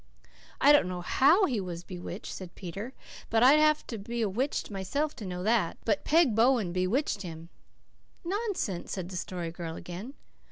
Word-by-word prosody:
"I 285 - +7
don't 290 -9 +5
know 180 -1 -4
HOW 310 - +4
he 245 - -1
was 175 -2 -6
bewitched," 180 +2 -7
said 185 -2 -9
Peter. 200 +7 -6 0.4
"I'd 250 +7 +6
have 305 0 +3
to 230 - -6
be 235 +3 -3
a 210 - +1
witch 250 +4 -2
myself 280 +11 -2
to 210 - -6
know 180 0 -4
that. 215 -5 +1
But 205 -3 +1
Peg 315 -6 +4
Bowen 225 -5 +3
bewitched 200 +5 0
him." 165 -2 -8 0.8
"Nonsense!" 375 - -2
said 185 -2 -4
the 190 - -7
Story 175 -2 -4
Girl 165 -1 -6
again. 185 - -8
205 Hz, 170 wpm, -29 LUFS, 180-265 Hz, 0.8 s, I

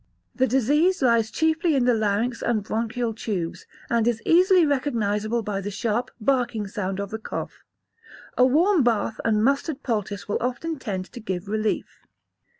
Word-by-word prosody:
The 260 0 +2
disease 290 - +2
lies 235 -3 +3
chiefly 320 +4 +1
in 255 -3 +2
the 245 - +4
larynx 220 +2 0
and 225 -3 0
bronchial 230 +2 -2
tubes, 190 -7 -4 0.2
and 230 -1 +1
is 235 -2 +1
easily 365 0 +5
recognisable 230 -5 0
by 200 -2 -3
the 200 - -4
sharp, 225 +4 -1
barking 240 -3 0
sound 195 -2 -4
of 200 -1 -4
the 220 - -4
cough. - - -6 0.8
A 250 - +4
warm 325 +8 +4
bath 225 -2 0
and 215 -2 +2
mustard 275 +2 0
poultice 210 -4 -3
will 205 - -1
often 260 +6 -3
tend 190 -6 -4
to 245 - -7
give 190 -3 -4
relief. 215 +1 -2
235 Hz, 160 wpm, -24 LUFS, 210-265 Hz, 0.8 s, easily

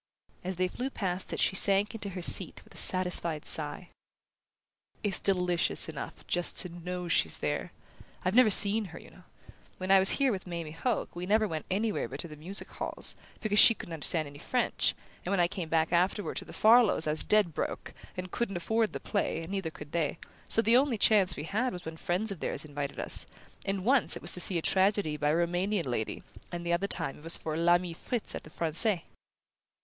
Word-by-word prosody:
As 185 +1 -4
they 185 +1 0
flew 250 +8 -5
past 185 -7 -2
it - - -4
she - - +1
sank 200 +3 +3
into 205 -3 -5
her 180 -2 -7
seat - - +4
with - - -18
a - - -12
satisfied 180 -4 +2
sigh. 155 +3 +1 1.1
"It's 200 -3 -1
delicious 180 -3 +1
enough - - -8
just 175 0 0
to 180 - +3
KNOW 180 +1 -6
she's 80 - +1
there! - - -3 0.5
I've 185 - +1
never 245 -1 +6
seen 210 +2 +7
her, 175 -2 -10
you - - -16
know. 180 - -18 0.5
When 185 +1 -3
I 195 - +7
was 190 - +6
here 275 -2 +2
with 190 -3 -5
Mamie 170 -3 -6
Hoke 200 +7 -3
we 175 +1 -5
never 215 +2 +2
went 160 -4 -6
anywhere 210 +2 -1
but - - -9
to 170 - -8
the 155 - -11
music 175 +7 +1
halls, - - -5 0.3
because 210 -2 +2
she 230 - +9
couldn't 170 - -9
understand 155 0 -1
any 145 0 -12
French; 245 +9 0 0.3
and - - -5
when 200 - +1
I 175 - +4
came 170 -2 -6
back 160 +1 0
afterward 185 +4 0
to - - -5
the - - -12
Farlows' 225 -6 +4
I 155 - 0
was 155 - -2
dead 210 -6 +2
broke, - - -5 0.2
and 185 0 -6
couldn't 200 -6 -2
afford 220 +5 -1
the - - -4
play, 200 -5 -2
and 165 - -9
neither 195 -4 -3
could 150 -2 -12
they; 165 -2 -1 0.3
so 225 - +3
the 230 +2 +5
only 265 -3 +1
chance 200 -5 +3
we 145 - -5
had 220 +10 -2
was 180 - -8
when 160 0 -6
friends 180 +6 -1
of 190 - -7
theirs - - -3
invited 145 -1 -6
us - - +2 0.4
and 195 -1 -2
once 260 0 +2
it - - -8
was - - +3
to - - 0
see 180 0 +1
a 165 - -3
tragedy 190 -4 +1
by 150 0 -1
a 150 - +2
Roumanian 175 +3 0
lady, 120 -4 -4 0.3
and 175 0 -6
the 170 - 0
other 180 +4 0
time 165 -8 -3
it - - -18
was 165 +1 +2
for 155 -1 -5
'L'Ami 175 +1 +2
Fritz' 230 +7 -3
at - - -5
the - - -14
Francais." 170 +4 +2
180 Hz, 220 wpm, -29 LUFS, 165-205 Hz, 1.1 s, she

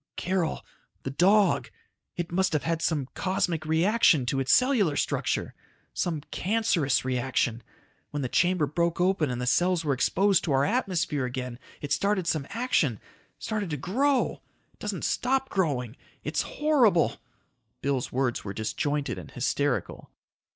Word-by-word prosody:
"Carol... 180 -2 -1 0.4
the 135 - -3
dog... 195 +7 +3 0.5
it 175 -1 -4
must 190 0 +1
have 150 - 0
had 165 0 -1
some 150 -6 0
cosmic 185 -4 -1
reaction 165 - +3
to 135 +3 0
its 130 -1 +1
cellular 235 - +3
structure... - - -1 0.4
some 165 -4 -1
cancerous 180 - +1
reaction... 125 -2 0 0.5
when 145 -1 -3
the - - 0
chamber 175 +4 +2
broke 170 +4 -1
open 180 -5 +2
and 125 -1 -3
the 125 - -2
cells 170 +8 +2
were 145 - +2
exposed 190 +8 +2
to 150 - 0
our 135 +1 +3
atmosphere 175 - 0
again 125 -1 -5 0.2
it 145 - -6
started 195 +3 +1
some 155 -4 -1
action... 175 - 0 0.4
started 210 -4 -3
to 150 - -2
grow... 260 - 0 0.4
doesn't - - -3
stop 265 +1 0
growing... 135 - -1 0.3
it's - - -1
horrible 260 - +2 0.3
..." - - -48
Bill's 135 -2 -1
words 125 -2 -1
were 100 - -5
disjointed 140 +7 -2
and - - -10
hysterical. 135 +2 -2
160 Hz, 145 wpm, -27 LUFS, 135-190 Hz, 0.5 s, dog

